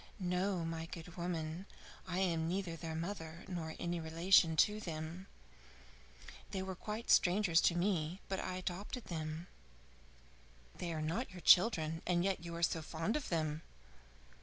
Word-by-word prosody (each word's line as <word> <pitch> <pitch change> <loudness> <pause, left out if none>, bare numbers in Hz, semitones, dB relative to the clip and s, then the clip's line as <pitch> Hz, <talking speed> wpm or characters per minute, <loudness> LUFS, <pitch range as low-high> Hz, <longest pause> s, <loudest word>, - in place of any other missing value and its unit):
"No, 180 -1 0
my 165 0 -3
good 170 +1 -9
woman; 170 +1 -3 0.4
I 175 - -2
am 170 -4 +1
neither 180 -1 -1
their 165 -1 -5
mother 165 -1 -5
nor 165 -4 -4
any 170 0 -1
relation 165 +1 +4
to 210 +7 +4
them. 165 0 -5 1.2
They 190 -2 -3
were 190 0 -4
quite 215 +5 -3
strangers 180 -2 +5
to 170 - +3
me, 175 -2 0
but 190 - -2
I 185 - -3
adopted 185 +6 -4
them." 160 0 -4 1.3
"They 175 - -4
are 155 -1 -2
not 170 +11 -1
your 180 -2 -10
children 165 -6 +5
and 175 -1 +3
yet 190 -2 0
you 170 0 -5
are 170 - -3
so 165 -1 +2
fond 165 +6 -2
of 300 - -2
them?" 155 -2 0
175 Hz, 155 wpm, -36 LUFS, 160-190 Hz, 1.3 s, strangers